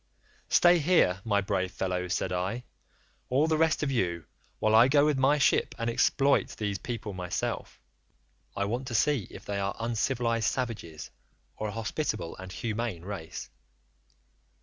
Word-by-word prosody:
"'Stay 175 0 +6
here, 145 - +3
my 105 -3 +2
brave 95 -1 -1
fellows,' 90 -2 -2
said 95 - -2
I, 95 +7 -2 0.7
'all 135 +4 +3
the 160 0 +2
rest 160 0 +2
of 140 - 0
you, 85 -9 -1 0.3
while 110 - +1
I 115 +3 +7
go 145 +2 +4
with 150 -3 +1
my 135 +3 +4
ship 140 - +2
and 115 0 -1
exploit 140 +4 +2
these 100 -3 -2
people 110 -2 -5
myself: 90 -1 -4 0.8
I 100 - +1
want 120 +5 -3
to 120 - -3
see 130 -2 +2
if - - -11
they 100 -1 -2
are 100 0 -2
uncivilised 115 0 0
savages, 110 - -5 0.4
or 110 - -3
a - - -4
hospitable 110 - -3
and 95 0 -9
humane 110 -4 -3
race. 95 -5 -7
115 Hz, 155 wpm, -29 LUFS, 95-135 Hz, 0.8 s, I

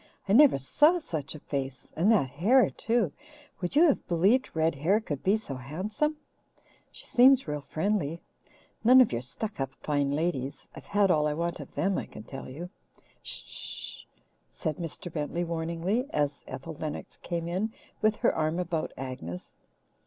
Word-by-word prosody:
"I 195 - +2
never 280 - +7
saw 295 - +4
such 160 - -5
a - - -8
face 135 -3 -5
and 185 +7 +4
that 205 -12 +4
hair 215 - +4
too. 225 -8 0 0.5
Would 180 +7 -2
you 310 - +7
have 295 - +2
believed 195 +9 +3
red 160 +1 +2
hair 165 +10 +2
could 145 -11 -5
be 200 +3 +3
so 210 -10 -7
handsome? 190 - -2 0.7
She - - -9
seems 260 -1 +5
real 150 -1 -2
friendly 165 +2 -1 0.6
none 250 +3 +8
of 255 - +6
your 115 - -1
stuck 205 - -5
up 135 0 -3
fine 145 -2 0
ladies! 145 -3 -2
I've - - -11
had 200 -2 +3
all 150 -2 +3
I 150 - -1
want 170 +1 -2
of 145 - -10
them, 185 +6 +1
I - - -6
can - - -10
tell 135 +3 -8
you!" 170 +7 -7 0.5
"Sh - - -2
sh - - -12
sh!" - - -5 0.4
said 155 -4 -3
Mr. 170 0 -6
Bentley 155 +3 -2
warningly, 170 +8 -1
as 145 - -1
Ethel 160 +5 -6
Lennox 155 0 -6
came 170 -1 -4
in 190 +6 -1 0.3
with 215 0 +3
her - - +2
arm 155 +1 0
about 170 -3 -2
Agnes. 120 -10 -6
165 Hz, 175 wpm, -28 LUFS, 145-210 Hz, 0.7 s, none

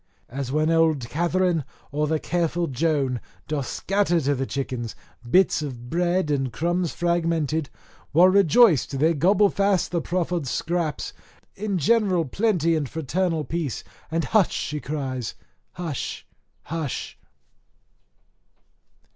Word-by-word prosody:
As 135 0 -4
when 155 +2 +2
old 160 -6 +2
Catherine 175 0 +1 0.3
or 150 +1 0
the 160 +1 +1
careful 170 +1 -1
Joan 135 -3 0 0.3
doth 145 -4 -2
scatter 195 -3 +1
to 145 0 +1
the 135 -1 -2
chickens 125 -4 -4 0.3
bits 185 +1 +4
of 125 -4 -7
bread 175 -1 +1
and 135 -3 0
crumbs 170 +7 0
fragmented, 165 -3 0 0.4
while 175 +5 +6
rejoiced 185 - +4
they 160 +4 +3
gobble 195 +7 +4
fast 200 -2 +1
the 170 -2 0
proffered 175 -3 -1
scraps 165 +2 -2 0.4
in 200 -1 -2
general 185 -1 +2
plenty 170 - +1
and 145 -4 -2
fraternal 160 +1 -1
peace, 150 -2 -3 0.3
and 165 +1 0
"hush," 210 -5 +3
she 150 - -3
cries, 135 -5 -4 0.4
"hush! 165 -7 -4 0.4
hush!" 160 -4 -4
160 Hz, 120 wpm, -24 LUFS, 145-175 Hz, 0.4 s, while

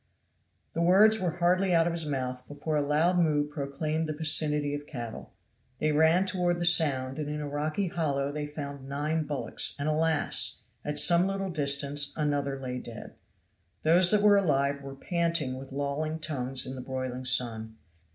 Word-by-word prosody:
The 165 - -2
words 205 +6 +5
were 180 - -1
hardly 180 +2 +1
out 165 0 +3
of 170 - -1
his 165 -2 +1
mouth 130 -3 -4
before 145 +2 -4
a 150 - +1
loud 155 +5 +1
moo 150 -3 +1
proclaimed 150 +2 -4
the - - -2
vicinity 150 -2 +2
of 145 0 -6
cattle. 120 -5 -8 0.5
They 155 +3 0
ran 160 +5 +3
toward 180 -2 0
the 175 - 0
sound, 140 -6 +4
and 150 -1 -4
in 150 0 -4
a 150 - -5
rocky 155 +7 -2
hollow 145 -5 -2
they 150 0 -5
found 140 -2 -8
nine 150 +3 -2
bullocks; 145 -2 -1
and 145 +1 -3
alas! 155 0 0 0.2
at 150 0 -4
some 175 +4 +5
little 195 -1 -3
distance 140 -1 0
another 145 -2 -2
lay 125 -1 -5
dead. 115 -3 -10 0.7
Those 175 +3 +5
that 210 0 +2
were 205 -1 +6
alive 140 -6 0
were 135 0 -9
panting 165 -4 -1
with 135 0 -11
lolling 145 +3 -3
tongues 135 -5 -2
in 130 - -6
the 130 - -7
broiling 130 -1 -5
sun. 115 -3 +2
150 Hz, 175 wpm, -28 LUFS, 140-165 Hz, 0.7 s, were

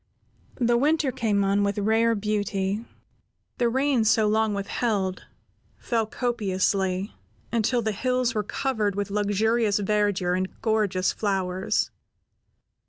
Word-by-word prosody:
The 240 -1 +3
winter 295 +1 +2
came 210 -4 0
on 195 +1 +2
with 200 0 -1
rare 225 +2 +2
beauty. 205 0 -1 0.8
The 240 -1 +3
rain, 265 -1 +2
so 220 -1 +3
long 215 0 +1
withheld, 200 -1 -2 0.5
fell 225 -3 -1
copiously, 195 -4 -1 0.4
until 235 +1 +1
the 220 - 0
hills 250 +3 0
were 215 - 0
covered 215 -2 -1
with 200 -1 -3
luxurious 210 +1 +1
verdure 205 -3 +1
and 185 0 -1
gorgeous 210 -5 +1
flowers. 190 -2 -1
210 Hz, 115 wpm, -25 LUFS, 200-230 Hz, 0.8 s, The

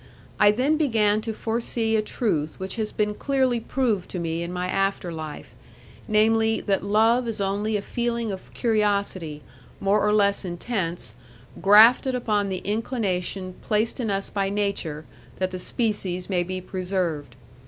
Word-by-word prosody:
I 205 - +7
then 260 +9 +2
began 220 -8 +2
to 225 - -3
forsee 225 0 -1
a 215 - +3
truth 165 -9 -2
which 190 +4 -5
has 215 -1 -2
been 210 -1 0
clearly 260 0 +1
proved 225 -6 -1
to 180 - -4
me 165 0 -2
in 170 +1 -4
my 180 0 -2
after 195 -2 -1
life, 155 -6 -7 0.5
namely, 220 +1 +3
that 195 -2 0
love 225 +4 +3
is 225 -2 -3
only 205 +2 0
a 200 - -5
feeling 235 -1 -2
of 190 -1 -8
curiosity 200 - 0 0.4
more 200 +1 +2
or 210 - +3
less 200 -1 +3
intense, 175 - -3 0.5
grafted 225 +6 +7
upon 210 -5 0
the 185 -1 -4
inclination 195 -4 -2
placed 220 +4 0
in 230 -3 -1
us 195 0 -2
by 195 -1 0
nature 195 -7 -2 0.3
that 185 0 -1
the 185 - -5
species 195 -4 -1
may 180 -2 +2
be 185 +1 -3
preserved. 180 -5 -3
205 Hz, 155 wpm, -24 LUFS, 185-225 Hz, 0.5 s, I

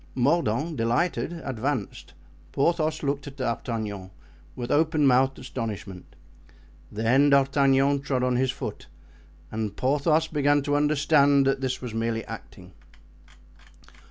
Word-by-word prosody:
Mordaunt, 145 +2 0
delighted, 120 +12 0
advanced, 130 -3 -4 0.4
Porthos 155 +1 0
looking 140 0 -3
at - - -25
D'Artagnan 115 -6 -4 0.5
with 120 0 -5
open 155 0 +2
mouthed 130 +1 +3
astonishment. 110 -7 -7 0.8
Then 120 +7 +3
D'Artagnan 140 0 +3
trod 135 -2 -1
on 125 -1 +1
his 130 +1 +1
foot - - -6 0.6
and 110 -2 -3
Porthos 150 +4 +1
began 145 -2 +1
to 145 0 0
understand 145 -1 +3
that 135 0 +1
this 130 -1 -3
was 120 -3 -5
merely 115 -1 -2
acting. 90 0 -11
135 Hz, 115 wpm, -25 LUFS, 115-145 Hz, 0.8 s, mouthed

